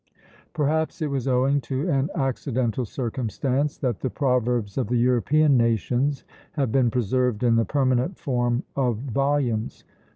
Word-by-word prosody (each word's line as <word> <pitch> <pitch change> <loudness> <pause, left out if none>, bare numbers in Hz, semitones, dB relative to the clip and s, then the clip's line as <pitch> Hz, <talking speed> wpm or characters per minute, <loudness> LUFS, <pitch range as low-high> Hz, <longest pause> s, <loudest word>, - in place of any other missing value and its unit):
Perhaps 160 +3 0
it 150 - -2
was 135 -2 -2
owing 135 +2 +2
to 135 +6 -3
an 140 -3 +1
accidental 130 -3 -1
circumstance 130 +4 -2
that 125 -6 -2
the 130 - -2
proverbs 125 -6 0
of 130 -5 -1
the 125 - 0
European 135 +5 +3
nations 120 +4 +1 0.3
have 135 -6 -1
been 130 -2 +3
preserved 125 0 0
in 120 -2 +4
the 115 0 +2
permanent 130 +4 0
form 120 -5 -1
of 125 -5 +1
volumes. 135 -2 -1
130 Hz, 140 wpm, -24 LUFS, 120-140 Hz, 0.3 s, in